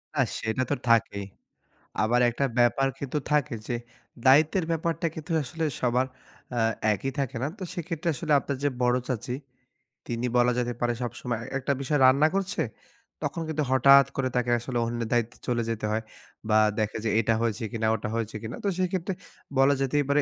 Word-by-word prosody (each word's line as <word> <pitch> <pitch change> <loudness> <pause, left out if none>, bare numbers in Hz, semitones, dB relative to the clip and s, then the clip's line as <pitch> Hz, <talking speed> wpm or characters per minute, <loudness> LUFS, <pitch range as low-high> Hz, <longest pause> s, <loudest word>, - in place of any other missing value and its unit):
না 140 - +3 0.2
সেটা 110 +3 -1
তো - - +3
থাকেই। 100 -3 +2 0.8
আবার 115 +3 +3
একটা 120 +4 0
ব্যাপার 120 +3 +4
কিন্তু 140 +1 -3
থাকে 145 -5 +2
যে, 120 - -1 0.5
দায়িত্বের 155 +6 +5
ব্যাপারটা 165 0 0
কিন্তু 160 0 -7
আসলে 160 +5 -5 0.2
সবার 125 +1 +2 0.5
আ - - +2 0.3
একই 135 +6 -3
থাকে 135 -2 -2
না। - - +1
তো - - -4
সেক্ষেত্রে 170 -2 -4
আসলে 155 +3 -4
আপনার 140 0 -4
যে 145 - +3
বড় 125 0 +3
চাচী, 125 0 -2 0.7
তিনি 120 +1 -2
বলা 120 0 +4
যেতে 120 0 -1
পারে 120 0 +2
সবসময় 120 0 -3 0.2
একটা 135 - -1
বিষয় 145 +1 +1
রান্না 135 +4 +6
করছে, 195 -2 -1 0.6
তখন 165 - -2
কিন্তু 155 -1 0
হঠাৎ 140 +1 +7
করে 130 -1 +1
তাকে 120 0 +1
আসলে 120 +1 -4
অন্যের 115 -1 -3
দায়িত্বে 120 -1 0
চলে 120 -1 +1
যেতে 115 -1 -2
হয়। 110 +1 -1 0.5
বা 110 - +5 0.2
দেখে 110 0 -1
যে - - +2
এটা 115 +1 +2
হয়েছে 115 -1 -1
কিনা 110 -1 0
ওটা 105 - -4
হয়েছে 115 -1 -3
কিনা? 110 - -5
তো - - +3
সেই 185 0 +2
ক্ষেত্রে 190 0 -1 0.5
বলা 135 +1 +6
যেতেই 145 +2 +2
পারে 145 +1 +4
130 Hz, 180 wpm, -27 LUFS, 115-145 Hz, 0.8 s, হঠাৎ